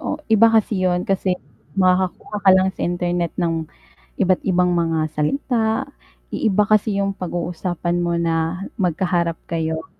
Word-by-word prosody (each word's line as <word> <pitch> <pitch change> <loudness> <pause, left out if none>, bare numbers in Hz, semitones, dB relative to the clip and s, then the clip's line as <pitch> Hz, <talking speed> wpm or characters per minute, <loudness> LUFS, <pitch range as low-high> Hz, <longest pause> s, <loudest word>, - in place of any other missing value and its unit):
Oh, - - -3 0.2
iba 220 +1 +7
kasi 215 -3 +1
'yon. 180 -1 +1
Kasi 190 -1 0 0.4
makakakuha 185 +2 +1
ka 190 - +8
lang 190 0 +4
sa - - -6
internet 175 -1 -1
ng 165 -2 -1 0.5
iba't-ibang 180 -1 +2
mga 165 -1 +1 0.2
salita. 220 - 0 0.5
I - - -1
iba 205 +1 +3
kasi 215 -1 +2
yung 195 0 0
pag-uusapan 175 -1 -3
mo 170 0 0
na 165 +3 -1
magkaharap 175 -1 0
kayo. 160 -1 -2
180 Hz, 140 wpm, -21 LUFS, 170-195 Hz, 0.5 s, ka